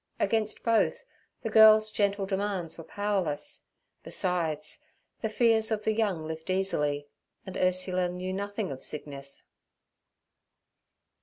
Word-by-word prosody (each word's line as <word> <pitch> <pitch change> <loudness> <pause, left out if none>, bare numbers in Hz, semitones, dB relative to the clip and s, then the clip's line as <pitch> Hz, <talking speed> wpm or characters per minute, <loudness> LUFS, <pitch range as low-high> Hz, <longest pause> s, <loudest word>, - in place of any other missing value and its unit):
Against 220 -1 0
both 230 - +2 0.4
the 225 - -2
girl's 215 0 +7
gentle 200 -1 +1
demands 195 -4 -2
were 165 - -9
powerless; 205 - -2 0.4
besides, 170 - -1 0.4
the 220 - -1
fears 220 -1 +3
of 215 -1 -1
the 220 - +2
young 200 -8 0
lift 160 +2 -6
easily, 150 -7 0 0.4
and 190 - -7
Ursula 185 0 +1
knew 180 +1 -4
nothing 200 0 -3
of 130 - -7
sickness. 140 -2 -5
190 Hz, 120 wpm, -29 LUFS, 165-215 Hz, 0.4 s, girl's